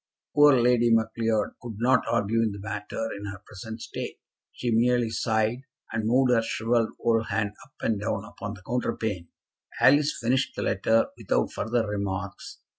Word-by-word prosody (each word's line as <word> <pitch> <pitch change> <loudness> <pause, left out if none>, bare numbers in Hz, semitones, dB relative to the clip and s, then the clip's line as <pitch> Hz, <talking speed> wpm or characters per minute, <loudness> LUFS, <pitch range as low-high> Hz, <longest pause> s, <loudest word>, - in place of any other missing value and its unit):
Poor 145 -3 +6
Lady 120 0 +4
Macleod 110 -1 +1
could 120 -3 -7
not 125 +3 +3
argue 115 0 +1
the 100 - -7
matter 105 +2 -4
in 100 +1 -7
her 100 -1 -7
present 110 +2 -8
state. - - -6 0.3
She 120 - -3
merely 120 0 +2
sighed, 110 +2 0 0.3
and 110 -1 -1
moved 125 +2 +4
her 115 -2 +4
shrivelled 115 0 0
old 115 -1 +1
hand 105 -1 -1
up 135 - -22
and 110 -3 0
down 105 -1 -2
upon 105 -1 -7
the 95 - -15
counterpane. 110 -7 -2 0.5
Alice 145 +2 +5
finished 130 +3 0
the - - -3
letter 110 +4 +2
without - - 0
further 115 -1 -1
remarks. 100 -1 -4
115 Hz, 160 wpm, -26 LUFS, 105-120 Hz, 0.5 s, Poor